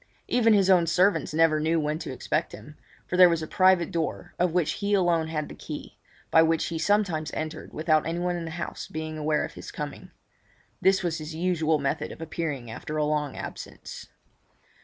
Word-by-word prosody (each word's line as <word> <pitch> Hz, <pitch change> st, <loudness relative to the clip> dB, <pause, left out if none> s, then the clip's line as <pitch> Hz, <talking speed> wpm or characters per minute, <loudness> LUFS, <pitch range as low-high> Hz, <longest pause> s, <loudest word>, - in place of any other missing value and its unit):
Even 230 Hz, -2 st, +4 dB
his 195 Hz, -3 st, +4 dB
own 180 Hz, -3 st, +5 dB
servants 180 Hz, -2 st, +2 dB
never 160 Hz, 0 st, +3 dB
knew 160 Hz, +2 st, +1 dB
when 150 Hz, +1 st, -1 dB
to -, -, -5 dB
expect -, -, -2 dB
him, -, -, -11 dB, 0.3 s
for 180 Hz, -, -2 dB
there 180 Hz, -1 st, +9 dB
was 165 Hz, -2 st, 0 dB
a -, -, -5 dB
private 185 Hz, -2 st, +3 dB
door, 165 Hz, -2 st, -3 dB
of 180 Hz, -1 st, +2 dB
which 165 Hz, -2 st, +1 dB
he 205 Hz, 0 st, +2 dB
alone 170 Hz, -4 st, +2 dB
had 155 Hz, -2 st, -3 dB
the -, -, -9 dB
key, -, -, -8 dB, 0.3 s
by 160 Hz, -, +7 dB
which 165 Hz, 0 st, +2 dB
he 165 Hz, -1 st, -3 dB
sometimes 175 Hz, -4 st, +1 dB
entered 155 Hz, 0 st, -5 dB
without 155 Hz, 0 st, +1 dB
anyone 175 Hz, +2 st, -1 dB
in 170 Hz, -1 st, -4 dB
the -, -, -5 dB
house 175 Hz, -, -5 dB
being 155 Hz, 0 st, -5 dB
aware 155 Hz, 0 st, 0 dB
of -, -, -10 dB
his -, -, -9 dB
coming. -, -, -7 dB, 0.7 s
This 190 Hz, 0 st, +3 dB
was 170 Hz, -2 st, -1 dB
his 155 Hz, +1 st, -7 dB
usual 160 Hz, -2 st, +1 dB
method 140 Hz, -1 st, -2 dB
of -, -, -10 dB
appearing 150 Hz, -7 st, -4 dB
after 150 Hz, +6 st, -5 dB
a 150 Hz, -, +2 dB
long 150 Hz, -2 st, -1 dB
absence. -, -, -8 dB
165 Hz, 200 wpm, -26 LUFS, 155-180 Hz, 0.7 s, there